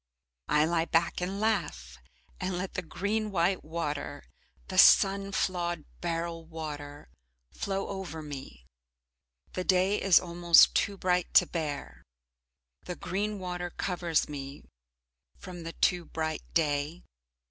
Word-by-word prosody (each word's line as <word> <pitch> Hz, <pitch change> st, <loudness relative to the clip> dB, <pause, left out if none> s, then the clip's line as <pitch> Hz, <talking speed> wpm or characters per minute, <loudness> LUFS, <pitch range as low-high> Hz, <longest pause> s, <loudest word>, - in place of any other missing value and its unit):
I 150 Hz, 0 st, +4 dB
lie 165 Hz, 0 st, +1 dB
back 170 Hz, +1 st, +1 dB
and 190 Hz, +3 st, -3 dB
laugh, 150 Hz, -, -1 dB, 0.4 s
and 185 Hz, -1 st, -2 dB
let 185 Hz, +1 st, -4 dB
the -, -, -2 dB
green 210 Hz, +5 st, -2 dB
white 185 Hz, 0 st, +1 dB
water, 150 Hz, -3 st, -4 dB, 0.4 s
the -, -, 0 dB
sun 195 Hz, 0 st, +6 dB
flawed 175 Hz, -4 st, -1 dB, 0.2 s
beryl 170 Hz, -1 st, -3 dB
water, 150 Hz, -3 st, -7 dB, 0.4 s
flow 195 Hz, 0 st, -3 dB
over 180 Hz, -5 st, -6 dB
me. 135 Hz, -, -9 dB, 0.9 s
The 185 Hz, -, -2 dB
day 190 Hz, +2 st, +2 dB
is 195 Hz, -3 st, +6 dB
almost 170 Hz, -1 st, +5 dB
too 200 Hz, -1 st, 0 dB
bright 180 Hz, -1 st, 0 dB
to -, -, +8 dB
bear, 145 Hz, -, -5 dB, 0.8 s
the 180 Hz, -, -5 dB
green 205 Hz, +4 st, -2 dB
water 180 Hz, -1 st, -4 dB
covers 175 Hz, -3 st, -1 dB
me 140 Hz, -1 st, -7 dB, 0.7 s
from 180 Hz, -2 st, -9 dB
the 165 Hz, 0 st, -6 dB
too 175 Hz, -2 st, +1 dB
bright 160 Hz, -1 st, -3 dB
day. 150 Hz, +1 st, 0 dB
170 Hz, 125 wpm, -29 LUFS, 155-185 Hz, 0.9 s, to